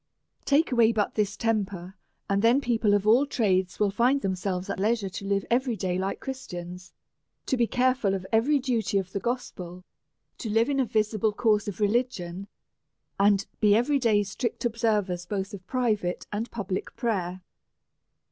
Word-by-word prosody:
Take 295 +2 +3
away 235 -2 +5
but 215 -2 0
this 210 -1 -1
temper, 200 -5 -2 0.3
and 200 0 +1
then 235 +4 +5
people 230 -6 +2
of 205 0 0
all 240 +7 +5
trades 190 -8 0
will 205 -2 +2
find 245 +7 +2
themselves 185 -1 -2
at 195 - -4
leisure 210 -1 +1
to 190 +2 -7
live 200 -1 0
every 250 0 +2
day 185 -2 -2
like 190 +1 -2
Christians, 180 -9 -7 0.5
to 265 - +1
be 240 -2 +2
careful 250 -6 +1
of 190 -1 -5
every 240 +7 +3
duty 240 -7 0
of 190 -1 -2
the 200 - -2
gospel, 185 -7 -5 0.6
to 225 - -4
live 225 +4 +2
in 275 -1 0
a 265 - +3
visible 215 -1 0
course 210 -2 +2
of 205 -1 -5
religion, 200 -4 -1 0.7
and 200 0 +4
to - - -14
be 210 -1 +5
every 275 +5 +2
day 215 -5 +3
strict 215 +5 -4
observers 210 -6 0
both 195 0 -3
of 190 -2 -9
private 215 -8 -1
and 215 +3 -3
public 195 -4 -4
prayer. 185 -7 -2
210 Hz, 170 wpm, -27 LUFS, 190-235 Hz, 0.7 s, away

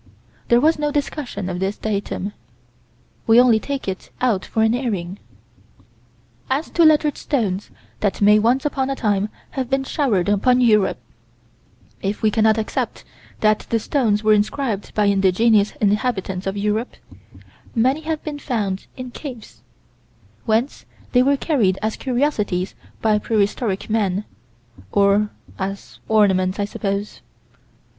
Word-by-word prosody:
There 235 - +5
was 310 +3 +3
no 295 0 0
discussion 280 -8 -3
of 180 -1 -3
this 195 +2 -2
datum. 205 -1 -3 0.9
We 225 +1 +7
only 245 -3 +5
take 275 0 -4
it 190 -1 -5
out 225 -7 +1
for 220 - 0
an 220 +1 +3
airing. 205 -7 -3 1.3
As 280 +5 -1
to 340 - +3
lettered 305 -2 +4
stones 205 -9 -1 0.3
that 205 -2 -1
may 210 +1 +6
once 245 +6 +2
upon 270 -2 -1
a 275 - -1
time 205 -4 0 0.2
have 260 -3 -3
been 270 0 +1
showered 245 - 0
upon 225 +5 +3
Europe, 215 -5 +3 1.0
if 200 +3 -3
we 215 - +4
cannot 220 0 +3
accept 220 - -3 0.4
that 215 0 +2
the 230 - +2
stones 220 -3 0
were 215 0 +5
inscribed 215 0 -1
by 210 - +3
indigenous 200 +2 +3
inhabitants 205 -3 0
of 195 +1 -2
Europe, 210 +4 -1 0.8
many 260 +6 +2
have 315 -1 -3
been 295 -2 -5
found 205 -9 -2
in 255 -1 -7
caves 245 -5 -9 0.9
whence 230 +5 0 0.2
they 250 - +5
were 280 +2 +3
carried 225 - +1
as 220 0 -1
curiosities 240 -9 -1 0.3
by 215 -1 +3
prehistoric 205 -1 -1
men, 210 -2 0 0.7
or 200 +1 +3 0.3
as 195 +1 -5
ornaments, 190 -3 +3
I 205 - +1
suppose. 200 0 -4
215 Hz, 135 wpm, -21 LUFS, 200-255 Hz, 1.3 s, We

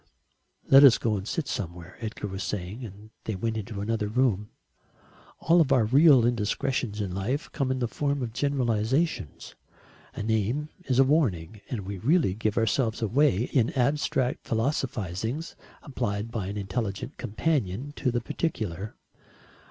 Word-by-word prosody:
"Let 135 +1 +8
us 135 -5 +8
go 110 -2 0
and 100 0 -5
sit 165 - -2
somewhere," 85 -1 -5
Edgar 110 -2 -5
was 95 0 -5
saying, 100 +5 -4
and 105 0 -10
they 110 - -2
went 110 +4 -2
into 105 -1 -5
another 110 0 -1
room. 105 -3 +1 0.9
All 170 +1 +4
of 145 -4 +1
our 125 -5 +4
real 135 +1 +6
indiscretions 120 0 -1
in 100 -3 -2
life 115 - -2
come 135 -3 -1
in 130 - 0
the 120 -2 0
form 140 +2 -1
of 115 -2 -5
generalisations. 130 - -1 0.6
A - - -4
name 110 +7 0 0.2
is 125 - 0
a 135 - +7
warning, 110 - 0
and 120 -5 -3
we 100 0 -6
really 140 - +3
give 110 +1 -2
ourselves 115 0 +1
away 115 -2 +3
in 125 -4 +3
abstract 130 -1 0
philosophisings 115 - -2 0.3
applied 115 -6 -3
by 105 -5 -3
an 100 +2 -4
intelligent 100 0 -4
companion 130 - -1
to 130 - 0
the 120 0 -1
particular. 110 - -3
115 Hz, 150 wpm, -27 LUFS, 105-135 Hz, 0.9 s, Let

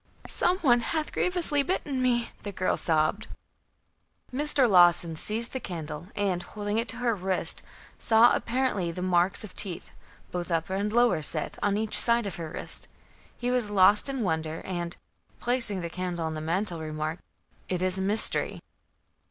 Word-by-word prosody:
"Some 360 +1 +1
one 245 -5 +4
hath 305 +6 -3
grievously 350 -5 0
bitten 280 -4 -2
me!" 240 -2 0
the 205 - -6
girl 185 -1 -1
sobbed. 160 +6 0 1.1
Mr. 285 -1 +5
Lawson 175 -4 +4
seized 220 +8 -1
the 260 - -3
candle 165 -5 -7
and, 195 -3 -1
holding 205 +3 -4
it 230 - -2
to - - -1
her 245 -1 0
wrist, 190 -2 -1 0.4
saw 230 +1 +4
apparently 235 -7 -1
the 180 +2 -5
marks 180 +3 +1
of 210 - -11
teeth, 185 -5 -4 0.4
both 175 0 -5
upper 170 +3 -2
and 200 +2 -2
lower 240 -7 +2
set, 155 0 -1
on 205 0 0
each 220 0 +2
side 235 -1 +8
of 195 - -6
her 165 -2 -6
wrist. 165 - -4 0.5
He 245 0 -2
was 245 -4 0
lost 205 +4 +4
in 270 -4 -3
wonder 160 -3 -3
and, 175 -2 -5 0.4
placing 235 -6 +4
the 170 - -4
candle 180 -2 -4
on 160 - -3
the 155 - -5
mantel, 170 +2 -2
remarked: 155 +1 -5 0.5
"It 180 -1 -2
is 185 +1 0
a - - -2
mystery." 205 +3 +2
195 Hz, 170 wpm, -26 LUFS, 175-235 Hz, 1.1 s, side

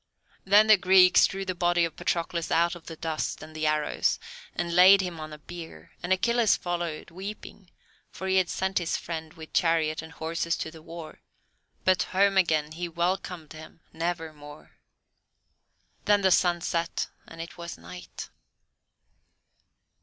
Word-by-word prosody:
Then 205 +2 +6
the 215 -1 +7
Greeks 185 -1 +6
drew 195 0 -5
the 185 - -2
body 175 -1 +2
of 165 - -6
Patroclus 170 -1 -2
out 170 +1 +2
of 175 -2 -12
the 165 - -7
dust 160 -1 -3
and 155 0 -12
the 155 0 0
arrows, 150 -1 +1 0.4
and 170 -1 -2
laid 190 +2 +8
him 175 -3 -5
on 155 0 -7
a 150 - -8
bier, 160 - -10
and 180 - -4
Achilles 235 +3 +3
followed, 170 -3 -4
weeping, 195 +1 -9 0.4
for 190 - -8
he 190 0 +2
had 185 -2 +2
sent 190 0 0
his 170 -2 -1
friend 160 -2 -6
with 160 -1 -12
chariot 160 -2 +2
and 160 0 -11
horses 165 +1 -2
to 160 - -5
the 160 -1 -13
war; 165 -1 -10 0.6
but 185 -1 +4 0.2
home 200 0 +4
again 155 -5 +2
he 170 +2 -4
welcomed 170 -1 -2
him 155 +1 -12
never 165 -1 -3
more. 145 0 -13 1.3
Then 205 -1 +4
the 190 - +4
sun 175 -1 +3
set 170 0 -2 0.2
and 165 - -12
it 170 +1 -8
was 170 0 -7
night. 180 0 -10
170 Hz, 160 wpm, -27 LUFS, 160-185 Hz, 1.3 s, laid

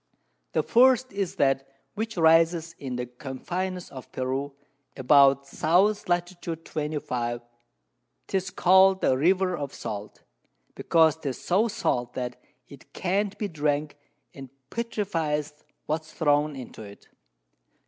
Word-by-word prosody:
The - - +2
first 255 0 +4
is 195 -3 -2
that 135 0 +1 0.3
which 220 0 -4
rises 165 0 +4
in 130 -3 -5
the 125 0 -3
Confines 175 +9 -5
of 130 -2 -10
Peru, 135 +2 -3 0.4
about 140 +1 +5
S. 190 +6 +2
Lat. 175 0 -1
25. 150 -7 -3 0.8
'tis 190 -1 -2
call'd 190 +1 +5
the 130 - +3
River 185 +5 +2
of 145 -4 -5
Salt, 105 0 -7 0.5
because 160 -2 +3
'tis 140 -6 -5
so 200 +6 +2
salt 125 - -1
that 125 -1 -5 0.3
it - - -16
can't 195 +3 -1
be 210 - -2
drank, 150 -2 -1 0.4
and 135 -1 -10 0.2
petrifies 165 -10 -2 0.3
what's 155 0 -3
thrown 150 -1 +1
into 130 -4 -9
it. 100 -1 -12
160 Hz, 120 wpm, -26 LUFS, 135-185 Hz, 0.8 s, about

